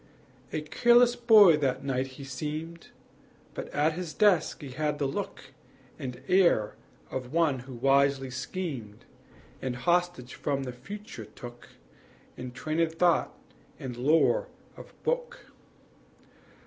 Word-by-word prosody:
A 155 - -2
careless 240 +10 +4
boy 215 -9 +7
that 135 -2 -1
night 130 -1 -2
be 140 - -8
seemed; 155 +5 -5 0.7
But - - -5
at 150 +2 +1
his 175 -1 -6
desk 200 -7 +3
he 135 - -7
had 150 +2 -1
the 145 - -1
look 135 - -5 0.5
And 125 -1 -6
air 175 - +3 0.4
of 125 -1 -5
one 160 -5 +2
who 125 +1 -10
wisely 135 +1 +2
schemed, 130 - -5 0.6
And 130 -1 -2
hostage 175 -1 0
from 140 -2 -2
the 125 -2 -5
future 135 - -9
took 120 +3 -11 0.7
In 125 0 -7
trained 155 +5 -1
thought 170 +1 +2 0.4
and 125 -2 -6
lore 165 - +3 0.3
of - - -12
book. 485 0 -2
145 Hz, 125 wpm, -28 LUFS, 130-175 Hz, 0.7 s, boy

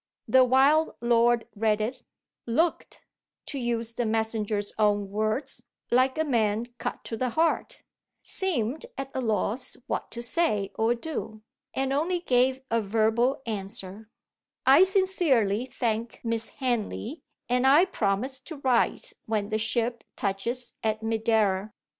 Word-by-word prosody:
The 260 0 +6
wild 275 +5 +4
lord 235 0 +3
read 215 0 +1
it 230 +5 -3 0.5
looked 320 +9 0 0.4
(to 280 - -4
use 230 -2 -2
the 240 - -1
messenger's 220 -2 -1
own 205 -2 +2
words) 220 +5 -2 0.3
like 255 +3 +3
a 315 - +2
man 225 -5 +1
cut - - -4
to 225 - -5
the 250 +3 -1
heart 330 - 0 0.4
seemed 315 - -1
at 270 0 -5
a 260 - -2
loss 225 +2 -1
what - - -3
to 235 - -6
say 235 - 0
or 225 +2 +1
do 225 -6 -6 0.3
and 270 0 0
only 340 +5 0
gave 260 -3 +2
a 230 0 +2
verbal 225 +6 +1
answer: 205 -1 -5 0.6
"I 275 +5 +7
sincerely 300 - +2
thank 230 -2 -2
Miss 230 -1 -2
Henley, 245 +2 -3 0.3
and 250 +1 +2
I 295 +7 +7
promise 250 - -1
to 315 +5 -9
write 260 -4 +1
when 210 -2 -1
the 215 0 0
ship 235 +1 -1
touches 220 +6 -1
at 220 0 -1
Madeira." 220 -3 +1
235 Hz, 135 wpm, -27 LUFS, 215-265 Hz, 0.6 s, I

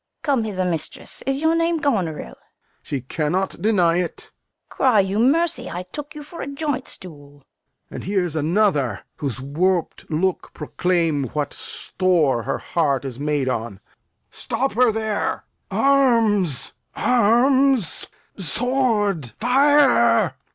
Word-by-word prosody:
Fool. 285 - -4
Come 245 -4 +1
hither, 185 -4 -2
mistress. 165 -4 -4
Is 270 +2 -1
your 320 +1 +4
name 330 0 +1
Goneril? 195 - -1
Lear. - - -14 0.5
She 140 -3 -4
cannot 165 +8 -2
deny 180 -6 +3
it. 180 -2 -3
Fool. - - -24
Cry 250 -6 +4
you 195 +2 -1
mercy, 315 +8 +1
I 175 +1 -5
took 295 +1 -7
you 300 - -7
for 320 +4 -9
a - - -5
joint 280 -2 -3
stool. 145 -5 -11
Lear. 140 - -23 0.5
And - - -7
here's 180 -4 0
another, 155 - +1 0.2
whose 135 -4 -3
warp'd 170 +6 -1
looks 175 +4 -1
proclaim 165 -2 0
What 150 -1 -2
store 165 -10 0
her 135 +4 -2
heart 140 -6 -1
is 130 -1 -6
made 145 -2 -1
on. 115 -5 -3 0.5
Stop 255 +3 -2
her 245 +1 +4
there! 220 -1 -2 0.2
Arms, 230 - +2 0.2
arms! 250 - +2 0.3
sword! 210 - 0
fire! 260 - +4
190 Hz, 135 wpm, -22 LUFS, -, 0.5 s, your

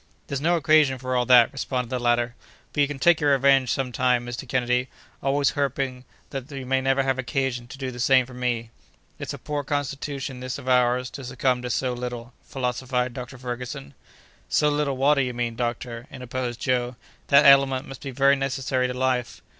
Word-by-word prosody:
"There's 140 -1 -4
no 170 +3 +3
occasion 155 -4 +4
for 130 0 -3
all 125 -1 +1
that," 125 -1 +6
responded 125 -3 -3
the 130 - -1
latter; 120 0 +1 0.4
"but 145 - +1
you 140 - +4
can 145 -1 -5
take 170 +4 +4
your 145 -1 +4
revenge 135 -1 +4
some 135 -2 -1
time, 125 0 +1
Mr. 120 0 -6
Kennedy, 125 0 0 0.3
always 140 0 +2
hoping 135 -2 -2 0.3
though 135 - -2
that 135 +2 -10
you 130 - -6
may 130 +1 +1
never 135 +1 +2
have 135 -1 0
occasion 130 -2 -2
to 125 - -10
do 130 -2 -4
the 125 - -9
same 130 +1 +4
for 130 - -13
me!" 120 -2 -2 0.5
"It's - - -5
a - - -9
poor 145 -1 -4
constitution 140 -1 -3
this 130 0 -4
of 135 -2 -11
ours 125 0 +2
to 140 - -8
succumb 125 0 0
to 125 - -5
so 125 +1 0
little," 120 -1 -6
philosophized 125 -1 -2
Dr. 125 0 -8
Ferguson. 120 - -6 0.6
"So 150 - +3
little 145 -2 0
water, 140 +1 +3
you 125 -2 -2
mean, 120 -1 -2
doctor," 120 0 -4
interposed 125 -2 -5
Joe; 125 -1 0 0.3
"that 140 - +6
element 140 -1 +5
must 135 - -10
be 140 - -5
very 140 +2 +4
necessary 130 -1 -1
to 125 - -4
life." 125 -2 -1
130 Hz, 200 wpm, -24 LUFS, 125-135 Hz, 0.6 s, that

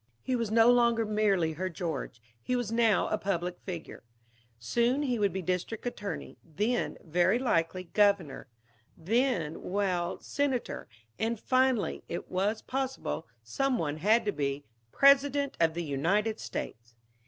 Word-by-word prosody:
He 260 - 0
was 230 -3 -1
no 225 +2 +6
longer 235 -2 +3
merely 200 -6 +1
her 185 +4 -3
George, 165 -8 -4 0.2
he 250 - -1
was 245 -3 -2
now 230 -4 +3
a 215 - 0
public 180 -3 -2
figure. 175 -4 -7 0.6
Soon 240 - +1
he 250 -5 0
would 200 -1 +2
be 190 -1 -4
district 185 +7 -3
attorney; 205 -4 -5
then, 210 +10 -1
very 175 +6 +2
likely, 185 -8 0
Governor; 190 -8 +1 0.5
then 190 - 0
well, 185 -2 -1
Senator; 275 -4 -2 0.3
and 225 0 -1
finally 255 -3 +1
it 170 - -5
was 200 +4 0
possible 265 - -3 0.2
some 255 - 0
one 150 -5 -2
had 215 +8 +3
to 205 - +1
be 140 -3 -2 0.3
President 280 0 +4
of 165 -1 +3
the 170 - -2
United 175 +10 0
States. 115 +1 -6
205 Hz, 140 wpm, -29 LUFS, 170-240 Hz, 0.6 s, no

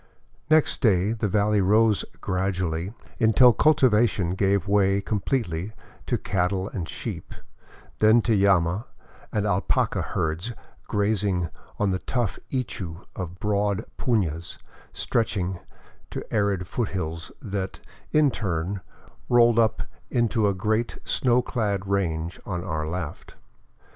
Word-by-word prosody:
Next 155 -1 +3
day 100 -4 +3
the 115 -1 -1
valley 105 +1 +2
rose 105 +2 +4 0.2
gradually, 90 -1 -1 0.3
until 120 +2 +6
cultivation 120 - +3
gave 100 +1 +1
way 100 -1 +3
com 105 +1 -1
pletely 100 -5 -2 0.3
to - - +1
cattle 95 +1 -1
and 90 -5 -5
sheep, - - -6 0.6
then 110 +2 +5
to 115 - +2
llama 95 0 +2 0.4
and 105 -1 0
alpaca 100 -1 +1
herds 85 +9 -2 0.3
grazing 100 -4 +1 0.3
on 105 -2 +1
the 95 - -1
tough 120 -6 -2
ichu 95 -9 -4
of 90 -1 -5
broad 105 +1 0
punas 85 - -1 0.3
stretching 95 -6 -1 0.5
to - - -5
arid 100 -4 +1
foothills 85 -6 -3
that, 95 -3 -4 0.3
in 150 -2 +4
turn, 95 -1 -2 0.5
rolled 120 -1 +5
up 110 -2 +2 0.3
into 115 -3 +2
a 100 - +1
great 110 +4 0
snow 125 -1 +2
clad 105 -6 -1
range 85 -4 -1
on 90 -3 -4
our 80 -4 -2
left. 85 -2 -5
100 Hz, 120 wpm, -25 LUFS, 90-110 Hz, 0.6 s, until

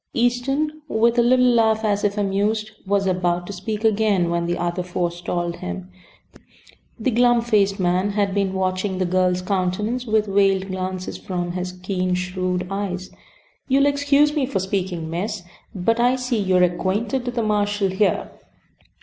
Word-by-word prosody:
Easton, 270 +6 0
with 235 -1 +2
a - - +7
little 250 +1 +4
laugh, 225 -3 +3
as 205 -1 +1
if 205 0 0
amused, 210 +2 0 0.2
was 200 0 +1
about 175 -1 0
to 200 - -7
speak 210 +4 -4
again 205 -5 +2
when 170 0 0
the 175 +1 -1
other 175 +1 -2
forestalled 175 -1 -3
him. 90 +1 -6 1.1
The 240 +3 0
glum 240 +1 +4
faced 205 -4 +2
man 185 +2 +1
had 200 -2 0
been 195 -1 0
watching 185 0 -1
the 185 - 0
girl's 180 0 +1
countenance 205 +6 -1
with 215 -1 +2
veiled 195 -1 +2
glances 185 0 -4
from 175 -3 -3
his 180 0 -4
keen, 185 0 -2
shrewd 180 0 -2
eyes. 190 -2 -4 0.6
"You'll 275 +1 +3
excuse 285 +1 +3
me 280 -4 +1
for 270 - -2
speaking, 185 -3 -2
miss, 185 +4 -3 0.3
but, 225 +5 +1
I 245 +2 +4
see 250 -3 -1
you're 185 -2 +3
acquainted 205 +8 0
with 245 - -3
the 235 - 0
marshall 205 -2 +1
here. 195 +2 0
195 Hz, 160 wpm, -22 LUFS, 180-225 Hz, 1.1 s, a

